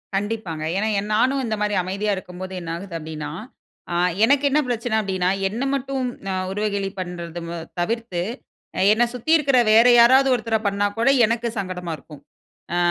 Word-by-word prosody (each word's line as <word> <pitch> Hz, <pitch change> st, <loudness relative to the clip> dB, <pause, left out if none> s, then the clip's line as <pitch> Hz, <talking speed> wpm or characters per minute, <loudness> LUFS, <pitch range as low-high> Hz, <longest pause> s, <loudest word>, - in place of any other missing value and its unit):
கண்டிப்பாங்க. 195 Hz, -6 st, -3 dB
ஏனா 215 Hz, +2 st, 0 dB, 0.3 s
நானும் 260 Hz, +5 st, +2 dB
இந்த 220 Hz, -2 st, -1 dB
மாதிரி 210 Hz, -1 st, 0 dB
அமைதியா 200 Hz, +3 st, -2 dB
இருக்கும்போது 185 Hz, 0 st, -8 dB
என்ன 165 Hz, -, -7 dB
ஆகுது 175 Hz, 0 st, -8 dB
அப்படினா, 155 Hz, -1 st, -6 dB, 0.6 s
ஆ -, -, -1 dB, 0.3 s
எனக்கு 280 Hz, +3 st, +3 dB
என்ன 295 Hz, -, +3 dB
பிரச்சனை 240 Hz, -1 st, -1 dB
அப்படினா, 185 Hz, -3 st, -1 dB, 0.2 s
என்ன 230 Hz, +6 st, -3 dB
மட்டும் 270 Hz, -1 st, -2 dB, 0.5 s
உருவகேளி 200 Hz, -1 st, -1 dB
பண்ணுறது 170 Hz, -1 st, -6 dB, 0.2 s
தவிர்த்து, 225 Hz, -1 st, -2 dB, 0.7 s
என்னை 240 Hz, +2 st, +3 dB
சுத்தி 250 Hz, +6 st, -3 dB
இருக்கிற 275 Hz, -3 st, +2 dB
வேற 230 Hz, +3 st, +7 dB
யாராவது 260 Hz, +3 st, +6 dB
ஒருத்தரை 225 Hz, -1 st, -1 dB
பண்ணா 200 Hz, 0 st, 0 dB
கூட 230 Hz, +4 st, +3 dB, 0.2 s
எனக்கு 230 Hz, +2 st, -1 dB
சங்கடமா 180 Hz, -3 st, -4 dB
இருக்கும். 145 Hz, 0 st, -14 dB, 0.5 s
ஆ -, -, +1 dB
210 Hz, 150 wpm, -22 LUFS, 180-235 Hz, 0.7 s, வேற